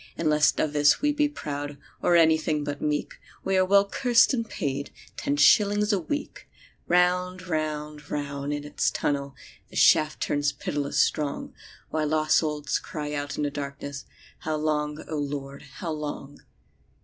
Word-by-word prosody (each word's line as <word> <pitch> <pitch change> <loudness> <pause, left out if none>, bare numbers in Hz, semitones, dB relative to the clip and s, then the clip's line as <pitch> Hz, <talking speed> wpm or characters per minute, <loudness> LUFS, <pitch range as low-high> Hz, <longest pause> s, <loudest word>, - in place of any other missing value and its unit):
"And 155 -2 +1
lest 150 0 +3
of 150 - 0
this 145 0 +4
we 295 - +4
be 295 0 +1
proud 145 - -5 0.2
Or 175 - +3
anything 160 -2 +3
but 145 0 -4
meek, 150 -1 -2 0.2
We 195 - 0
are 185 - +5
well 200 +1 +4
cursed 245 +3 +4
and 230 -3 -2
paid— 140 0 -3 0.2
Ten 145 - -1
shillings 205 +8 +5
a 200 - +2
week!" 285 - -5 0.4
Round, 180 +1 +2
round, 150 -2 -3
round 145 -1 -3
in 145 0 -3
its 150 0 0
tunnel 140 -1 -2 0.3
The - - -14
shaft 155 0 +4
turns 145 0 0
pitiless 145 -1 -2
strong, 150 -2 0 0.4
While 155 -1 0
lost 155 0 +3
souls 150 -2 0
cry 150 -2 -5
out 145 0 -4
in 150 - -1
the 145 - -1
darkness: 140 0 -6 0.3
"How 155 0 -2
long, 150 0 -1
O 155 - -3
Lord, 140 -1 -5
how 170 - -5
long?" 145 -2 -6
150 Hz, 160 wpm, -26 LUFS, 145-175 Hz, 0.4 s, are